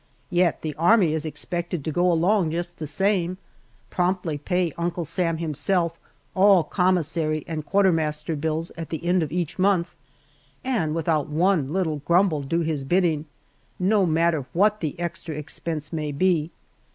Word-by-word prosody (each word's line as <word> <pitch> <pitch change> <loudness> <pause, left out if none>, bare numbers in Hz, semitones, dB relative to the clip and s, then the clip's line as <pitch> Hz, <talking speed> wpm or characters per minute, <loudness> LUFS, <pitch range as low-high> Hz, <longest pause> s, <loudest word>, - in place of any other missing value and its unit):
Yet 175 -1 +2
the 155 -1 -3
Army 175 -2 +4
is 160 0 -2
expected 175 0 -4
to 160 - -1
go 175 +3 +2
along 175 +1 +2
just 175 +2 -4
the 155 - -4
same, 185 +3 0 0.5
promptly 180 -3 0
pay 175 +2 -1
Uncle 170 0 -2
Sam 165 0 -1
himself 170 +2 -1 0.4
all 190 -2 +5
commissary 160 -3 0
and 160 -2 -4
quartermaster 160 -5 +1
bills 160 +2 -2
at 165 -2 -6
the 165 +1 -5
end 180 +1 +3
of 155 -3 -2
each 175 0 -3
month, 185 -2 +2 0.7
and 205 -13 0
without 160 -2 0
one 160 -2 +1
little 165 -4 0
grumble 170 +1 +2
do 165 +5 -1
his 155 -4 -2
bidding, 165 0 +1 0.5
no 195 +1 +2
matter 160 -3 +1
what 210 +4 +3
the 155 0 -4
extra 170 -2 -4
expense 155 +1 -5
may 155 -2 -2
be. 165 0 +1
170 Hz, 150 wpm, -24 LUFS, 155-180 Hz, 0.7 s, all